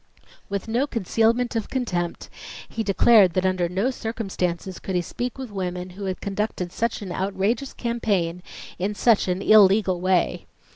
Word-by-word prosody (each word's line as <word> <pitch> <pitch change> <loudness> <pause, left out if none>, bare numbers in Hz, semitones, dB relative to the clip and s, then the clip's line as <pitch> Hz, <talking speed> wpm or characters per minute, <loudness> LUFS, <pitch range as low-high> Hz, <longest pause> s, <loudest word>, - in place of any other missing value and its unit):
With 200 +1 -3
no 240 +6 +1
concealment 230 +1 +1
of 225 -2 -2
contempt, 180 -10 -2 0.4
he 225 - -4
declared 200 -2 +5
that 185 +1 0
under 185 -2 +1
no 195 +9 0
circumstances 190 -6 -3
could 190 - -4
he 180 - +2
speak 245 +8 -4
with 260 -4 -7
women 180 -2 -4
who 195 +2 -7
had 185 -1 -3
conducted 200 -3 -3
such 230 0 -2
an 190 - -6
outrageous 200 +8 -1
campaign 200 -8 -1 0.4
in 200 +3 -1
such 225 -2 +3
an 180 +1 -1
"illegal" 195 -3 +5
way. 185 -1 +1
195 Hz, 155 wpm, -24 LUFS, 185-225 Hz, 0.4 s, declared